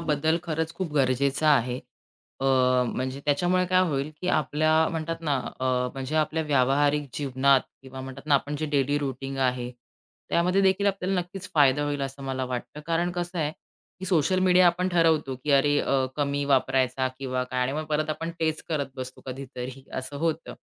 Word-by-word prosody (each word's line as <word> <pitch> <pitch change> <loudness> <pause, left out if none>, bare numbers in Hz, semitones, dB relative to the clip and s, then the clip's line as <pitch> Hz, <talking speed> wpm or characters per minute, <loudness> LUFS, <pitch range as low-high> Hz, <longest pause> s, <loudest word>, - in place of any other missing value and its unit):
बदल 160 0 +1
खरंच 160 0 -2
खूप 180 -5 -4
गरजेचा 140 +2 +2
आहे. 125 -4 +3 0.6
अ, - - -2 0.5
म्हणजे 130 +2 -3
त्याच्यामुळे 175 +5 +2
काय 185 0 +3
होईल 140 0 -2
की 180 - -2
आपल्या 155 +1 +2
म्हणतात 165 0 -3
ना 150 -4 0 0.2
अ, - - -1 0.3
म्हणजे 135 +2 -5
आपल्या 155 +1 +1
व्यावहारिक 145 +1 +2
जीवनात 135 -1 +3 0.2
किंवा 130 0 -9
म्हणतात 135 +2 -9
ना 150 - +4
आपण 145 +2 0
जे 155 +1 -2
डेली 145 +1 +2
रूटीन 135 -1 -4
आहे, 125 -2 0 0.6
त्यामध्ये 180 +3 +2
देखील 190 +1 +3
आपल्याला 195 -1 0
नक्कीच 185 +1 -8
फायदा 145 -1 +4
होईल 145 -1 -2
असं 135 +1 -5
मला 130 -1 -2
वाटतं. 125 +3 -5
कारण 170 +1 +1
कसं 175 0 -4
आहे, 150 -1 0 0.5
की - - -5
सोशल 185 0 +2
मीडिया 185 -1 +5
आपण 180 +2 +2
ठरवतो 160 -6 +2
की 150 - -1
अरे 145 +1 +4
अ, 135 -1 +1
कमी 145 -1 0
वापरायचा 130 -1 +2
किंवा 130 -2 -2
काय 125 0 -3
आणि 130 - -1
मग 155 +2 -3
परत 155 +1 0
आपण 165 +2 -3
तेच 160 -1 0
करत 150 -4 -1
बसतो 130 0 -7
कधीतरी 130 0 -7
असं 130 +2 -5
होतं. 160 +1 -2
145 Hz, 175 wpm, -26 LUFS, 135-165 Hz, 0.6 s, मीडिया